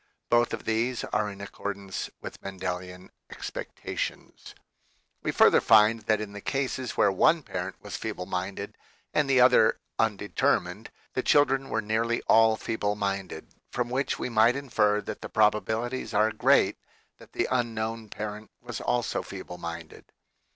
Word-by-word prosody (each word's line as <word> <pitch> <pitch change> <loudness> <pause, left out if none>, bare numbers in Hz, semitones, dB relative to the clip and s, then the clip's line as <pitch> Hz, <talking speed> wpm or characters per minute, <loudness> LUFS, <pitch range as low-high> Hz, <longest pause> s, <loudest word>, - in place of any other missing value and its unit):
Both 120 0 +4
of - - -5
these 115 +2 0
are 105 0 -1
in 100 0 -9
accord 100 0 -5
ance 100 -1 -5
with - - -8
Mendelian 90 -1 -6 0.2
expectations. - - -6 0.7
We - - -1
further - - +5
find 110 0 +5
that 110 -1 +3
in 105 -1 -6
the 100 - -8
cases 130 -2 -2
where 100 - +4
one 155 - +3
parent 95 -3 -4
was 105 - -5
feeble 105 -5 -5
minded 95 +2 -4 0.3
and 150 -2 +2
the 130 -1 +4
other 125 -3 +6 0.2
undetermined, 100 -2 0 0.2
the 130 - 0
children 135 -1 +3
were 110 - -1
nearly 115 +2 0
all 110 0 +5
feeble 105 -3 -2
minded, 100 -5 -3 0.2
from 125 -1 -2
which 135 +1 0
we - - -3
might 115 0 +4
infer 110 -7 +1
that - - -7
the - - -6
probabilities 110 +4 0
are 110 +2 +4
great - - +3 0.4
that - - -17
the - - 0
unknown 115 -2 -2
parent 105 +1 -6
was 120 -2 -7
also 120 -1 0
feeble 90 -2 -8
minded. 85 -1 -7
110 Hz, 150 wpm, -27 LUFS, 100-120 Hz, 0.7 s, other